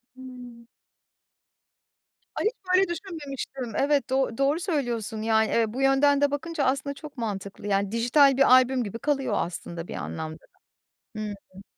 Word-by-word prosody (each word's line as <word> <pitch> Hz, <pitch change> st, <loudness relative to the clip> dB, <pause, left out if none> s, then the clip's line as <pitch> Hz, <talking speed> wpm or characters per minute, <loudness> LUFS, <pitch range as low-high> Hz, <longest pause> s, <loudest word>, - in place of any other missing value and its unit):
Hıı. 245 Hz, -2 st, -11 dB, 1.7 s
Ay, -, -, -2 dB
hiç 440 Hz, -, +2 dB, 0.2 s
böyle 380 Hz, 0 st, +5 dB
düşünmemiştim. 280 Hz, -, -6 dB
Evet, 280 Hz, -1 st, +1 dB
do 265 Hz, -3 st, 0 dB
doğru 280 Hz, +4 st, +2 dB
söylüyorsun, 240 Hz, -, -2 dB
yani, 220 Hz, 0 st, +2 dB
evet. 230 Hz, -1 st, +2 dB
Bu 265 Hz, -, -3 dB
yönden 275 Hz, +1 st, +4 dB
de 285 Hz, -1 st, +3 dB
bakınca 310 Hz, +1 st, -2 dB
aslında 275 Hz, +2 st, 0 dB
çok 295 Hz, -1 st, -11 dB
mantıklı. 205 Hz, -3 st, -5 dB
Yani, 200 Hz, 0 st, +1 dB
dijital 255 Hz, +4 st, +4 dB
bir 275 Hz, -, +5 dB
albüm 255 Hz, 0 st, +5 dB
gibi 225 Hz, +1 st, -6 dB
kalıyor 275 Hz, -5 st, 0 dB
aslında 170 Hz, 0 st, -4 dB
bir -, -, -6 dB
anlamda 160 Hz, 0 st, -5 dB, 0.8 s
da. -, -, -5 dB
Hıı. 200 Hz, -2 st, -8 dB
260 Hz, 150 wpm, -26 LUFS, 220-285 Hz, 1.7 s, böyle